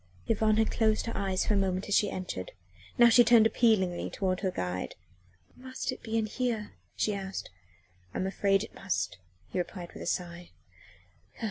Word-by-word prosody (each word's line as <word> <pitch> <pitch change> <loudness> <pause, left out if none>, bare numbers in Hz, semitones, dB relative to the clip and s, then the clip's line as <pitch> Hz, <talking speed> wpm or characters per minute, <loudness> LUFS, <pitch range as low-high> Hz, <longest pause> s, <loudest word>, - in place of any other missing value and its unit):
IV - - 0
Yvonne 215 0 +3
had 220 0 +2
closed 220 -1 +2
her 230 - -4
eyes 190 -2 0
for - - +2
a - - +3
moment 190 -1 0
as 205 - -1
she 205 - +4
entered; 180 - -5 0.4
now 240 - +8
she 235 +1 +7
turned 235 -1 +6
appealingly 215 -6 +2
toward 185 -1 -1
her 190 - 0
guide. 90 - -3 0.6
"Must 260 +1 -4
it 255 - -8
be 225 0 -2
in 220 - +1
here?" 225 -1 -2 0.2
she 210 - 0
asked. 195 -1 -5 0.6
"I - - -5
am 185 - -1
afraid 195 +1 +2
it - - -10
must," 190 - -2 0.3
he - - -1
replied 175 -1 -5
with - - -9
a - - -5
sigh. 175 -1 -3
200 Hz, 190 wpm, -29 LUFS, 185-225 Hz, 0.6 s, now